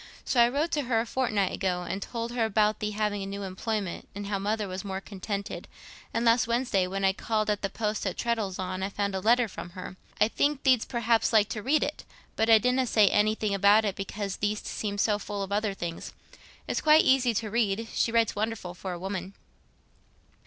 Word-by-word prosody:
So 245 - +3
I 235 - +6
wrote 295 +6 -1
to 295 -3 0
her 235 -2 +2
a 225 - -1
fortnight 220 -6 0
ago, 180 -2 -1
and 195 - -3
told 230 +2 -4
her 240 -1 0
about 215 -1 +2
thee 210 - -1
having 210 -1 -1
a 195 - -4
new 200 +1 -5
employment, 195 0 -3
and 205 0 -5
how 200 -1 -2
Mother 210 +1 -1
was 185 0 -5
more 190 -1 -4
contented; 200 0 -5 0.4
and 230 +1 -1
last 230 0 +4
Wednesday, 235 -6 +1
when 195 +1 -2
I 190 - +4
called 215 +1 -1
at 205 - -2
the 195 - -1
post 210 0 -2
at 185 - -3
Treddles'on, 190 -5 -2
I 190 - -1
found 200 0 -2
a 190 - -1
letter 235 +4 +3
from 180 - -8
her. 185 0 -7 0.2
I 210 - +5
think 285 +4 0
thee'dst 255 -4 +3
perhaps 235 -2 +1
like 215 -2 +4
to 215 - -4
read 290 +7 +2
it, 295 - -4 0.3
but 220 +1 +1
I 225 - +9
didna 250 +3 +1
say 215 -3 +5
anything 215 0 +1
about 200 +2 +5
it 200 -2 -1
because 195 0 -4
thee'st 210 0 -2
seemed 205 -1 -3
so 210 -2 +2
full 205 -1 -4
of 195 - -7
other 205 -1 0
things. 170 -3 -6 0.5
It's - - -1
quite 310 0 +6
easy 255 -3 +3
t' 220 +1 -1
read—she 225 +1 0
writes 230 -1 +2
wonderful 210 -4 -3
for 180 +1 -6
a 175 - -6
woman." 190 0 -5
210 Hz, 215 wpm, -28 LUFS, 195-230 Hz, 0.5 s, I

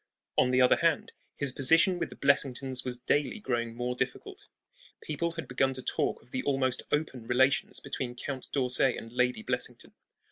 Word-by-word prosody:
On 125 - +4
the 130 0 +3
other 125 - +5
hand, 165 -3 +1 0.3
his 140 -2 0
position 165 +8 +4
with - - -2
the - - -11
Blessingtons 135 -2 +1
was 125 -1 -2
daily 140 - 0
growing 120 - -2
more 125 +1 -2
difficult. 375 - -5 0.5
People 170 - -2
had 165 -1 -6
begun 130 +1 +1
to 130 - -8
talk - - -1
of 120 - -21
the 130 - -1
almost 130 -3 0
open 135 -6 -2
relations 130 +3 +2
between 125 -2 -4
Count 130 +1 -5
d'Orsay 130 -1 +2
and 115 +1 -9
Lady 125 -2 +1
Blessington. 125 -1 -2
130 Hz, 175 wpm, -29 LUFS, 125-140 Hz, 0.5 s, other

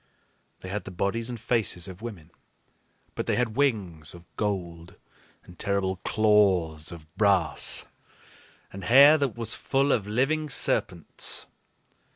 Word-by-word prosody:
They 95 - -8
had 105 +2 -4
the - - -7
bodies 100 +6 -2
and 120 -2 -6
faces 110 -6 0
of 95 +1 -10
women, 95 -9 -9 0.8
but - - -5
they - - +1
had 120 -3 -1
wings 95 - -1
of 85 0 -14
gold, 85 -5 -4 0.5
and 90 - -16
terrible 100 -1 -1
claws 95 -8 +2
of 85 -3 -10
brass, 100 -7 +2 0.9
and 95 0 -8
hair 140 +7 +7
that 140 -5 -2
was 115 -2 +3
full 140 +1 0
of 105 -6 0
living 145 +8 0
serpents. 90 - 0
100 Hz, 135 wpm, -26 LUFS, 90-120 Hz, 0.9 s, hair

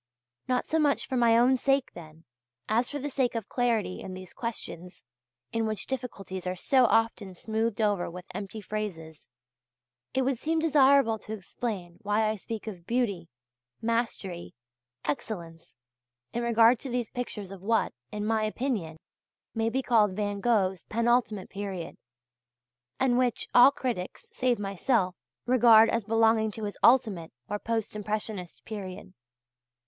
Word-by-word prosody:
Not 250 -1 +1
so 320 - 0
much 290 -2 +2
for 260 - -2
my 235 -2 +5
own 250 +3 +5
sake, 270 +1 +1
then, 160 -1 -12 0.4
as 235 +3 +1
for 290 - -4
the 290 +1 -4
sake 255 -3 0
of 225 -3 -3
clarity 230 -6 0
in 185 - -7
these 185 -1 -10
questions, 180 -6 -6 0.5
in 225 -1 0
which 215 -2 -3
difficulties 195 -8 -5
are 180 - -1
so 255 +7 +3
often 225 -4 +1
smoothed 220 +3 -2
over 205 -4 +1
with 180 +1 -9
empty 205 +2 -6
phrases, 180 -7 -6 0.9
it 265 - +2
would 260 -2 0
seem 325 +1 0
desirable 280 -7 +4
to 215 - -7
explain 190 -3 -5
why 215 +1 +1
I 215 - 0
speak 220 +2 -6
of 180 -6 -8
"beauty," 205 -9 -1 0.5
"mastery," 225 -6 -2 0.5
"excellence," 165 +1 -5 0.6
in 240 - -1
regard 235 0 +5
to 270 - -6
these 240 -2 -2
pictures 210 -6 -5
of 195 -2 -9
what, 225 +3 +1 0.2
in 210 0 -3
my 220 0 +1
opinion, 215 - -2 0.6
may 225 0 0
be 265 +3 -1
called 215 -6 +3
Van 205 -1 -2
Gogh's 195 -5 +1
penultimate 230 -3 +1
period, 195 -4 -5 1.0
and 250 -2 +3
which 245 -2 0
all 245 +2 +9
critics, 245 -9 -4
save 250 -2 +1
myself, 195 -1 0 0.3
regard 230 -3 +6
as 230 -3 -1
belonging 225 0 +3
to 220 - -6
his 205 -1 -5
ultimate 215 -10 +4 0.2
or 205 - -3
post 225 -1 -2
impressionist 210 -3 -3
period. 190 -3 -7
220 Hz, 150 wpm, -28 LUFS, 195-240 Hz, 1.0 s, all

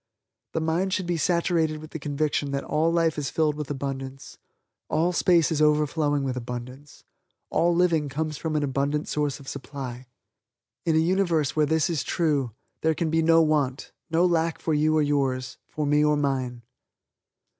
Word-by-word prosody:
The - - 0
mind 170 +4 0
should 185 - -1
be 175 0 -1
saturated 165 -2 +1
with 155 +1 -11
the 160 - -5
conviction 145 0 -1
that 140 0 -2
all 155 +3 +1
life 165 -2 +1
is 140 - -2
filled 155 -2 +1
with 150 -1 -6
abundance 135 -1 -5 0.5
all 170 +3 +1
space 170 -2 +3
is 155 -1 0
overflowing 150 -1 +2
with 130 -2 -2
abundance 125 +3 -8 0.5
all 170 0 +2
living 165 -4 +2
comes 155 +2 -3
from 155 +2 -3
an 150 - +1
abundant 140 +2 -1
source 150 -1 -1
of 135 - -14
supply. 130 -3 -7 0.8
In 160 - +3
a 160 0 +3
Universe 175 -6 +1
where 155 -1 +3
this 160 0 +2
is 160 -7 -1
true, 150 -7 0 0.3
there 160 0 +2
can 160 -1 -1
be 165 0 +2
no 165 0 +5
want, 145 -4 0 0.2
no 165 +2 +3
lack 165 -2 +1
for 160 - -1
you 155 +1 +2
or 155 - +3
yours 135 -3 -1
(for 150 - -3
me 150 +1 +3
or 150 0 +3
mine). 130 -4 -2
150 Hz, 175 wpm, -25 LUFS, 140-160 Hz, 0.8 s, no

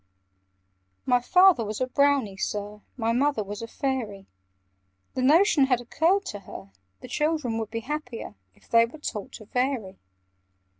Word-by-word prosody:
"My 250 -1 +3
father 365 -1 +5
was 210 0 -4
a 255 - +1
Brownie, 275 -5 +2
Sir; 205 +2 -4 0.2
My 230 -2 0
mother 275 -2 +1
was 205 +2 -7
a 230 - -5
Fairy. 230 -7 -3 0.9
The 255 - -2
notion 305 +2 +5
had 255 -3 +2
occurred 335 +11 +1
to 205 - -5
her, 100 - -11 0.3
The - - -9
children 300 -4 -1
would 220 -2 -4
be 230 0 -4
happier, 250 - -5 0.2
If - - -25
they 230 0 +5
were 250 - -12
taught 215 -9 -6
to 215 - -10
vary. 245 -5 -2
245 Hz, 155 wpm, -26 LUFS, 215-285 Hz, 0.9 s, father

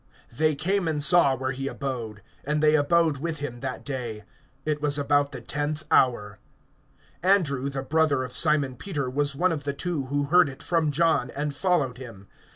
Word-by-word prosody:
They 155 +1 +2
came 190 +4 0
and 155 -2 0
saw 150 -4 +5
where 130 +1 -3
he 135 +1 -4
abode; 120 -8 -5 0.2
and 150 +2 -1
they 155 0 +5
abode 155 0 +3
with 165 +1 -3
him 140 -4 -6
that - - -5
day. 120 -6 -5 0.4
It 150 -1 -1
was 145 -1 +2
about 145 0 +1
the - - -8
tenth 150 +1 -3
hour. 105 -5 +2 0.8
(40)Andrew, 150 -8 +2
the 135 -1 -4
brother 145 -2 +1
of 130 - -7
Simon 145 -5 +1
Peter, 140 -7 -3
was 145 +1 -1
one 180 +5 +2
of 150 -3 -3
the 140 0 -2
two 145 -2 -3
who 145 +2 0
heard 175 +2 +4
it 135 - -11
from 165 -3 +1
John, 165 +3 +1
and 145 0 -3
followed 145 -9 0
him. 115 -7 -10
145 Hz, 185 wpm, -25 LUFS, 130-160 Hz, 0.8 s, saw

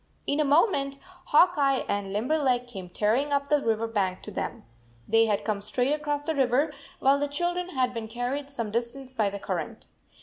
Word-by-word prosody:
In 285 - 0
a - - +4
moment 280 -2 +2 0.3
Hawk 355 +4 +5
Eye 275 -2 +2
and 200 -1 -2
Limberleg 250 +3 +1
came 195 -7 -8
tearing 225 +10 +1
up 280 0 0
the 295 -1 +3
river 225 -2 0
bank 195 -5 -1
to 210 - -4
them. - - -4 0.4
They 225 +1 +4
had 205 -2 0
come 210 -2 -1
straight 250 +6 0
across 295 -1 -2
the 320 - -1
river, 275 +2 +2 0.2
while 275 +1 +3
the 290 - 0
children 350 +5 -2
had 255 -1 +1
been 230 -2 -4
carried 245 +5 -3
some 230 -6 -3
distance 245 +3 -3
by 215 -5 +1
the 200 - -5
current. - - -4
260 Hz, 195 wpm, -27 LUFS, 225-285 Hz, 0.4 s, Hawk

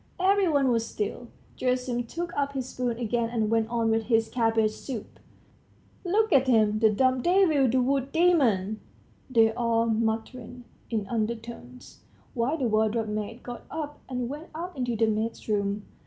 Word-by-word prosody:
Every 390 +1 +3
one 285 -4 +3
was 230 -1 +1
still. 210 +3 -4 0.3
Gerasim 250 -1 -1
took 340 +5 -5
up 280 -1 -1
his 260 -2 -4
spoon 245 -2 -2
again 235 0 -1
and 225 -2 -1
went 225 -1 +1
on 230 -1 +1
with 225 0 +1
his 225 -1 +2
cabbage 225 -3 +2
soup. 230 0 -8 0.8
"Look 410 +2 +2
at 265 -1 +4
him, 215 -3 +3
the 220 0 +5
dumb 255 +4 +2
devil, 340 -7 +3
the 255 +3 +2
wood 270 +1 0
demon!" 245 - +2 0.5
they 225 -3 +4
all 230 -1 +1
muttered 230 +2 -2 0.3
in 220 -3 -1
undertones, 220 - -5 0.3
while 255 +6 0
the 265 -5 0
wardrobe 220 0 +1
maid 215 +3 -4
got 245 -1 -7
up 300 -2 -5
and 250 -2 -2
went 295 +5 -7
out 350 +3 -6
into 245 -3 -2
the 225 +1 +3
maid's 220 +1 -2
room. 205 -1 -1
235 Hz, 165 wpm, -27 LUFS, 220-270 Hz, 0.8 s, the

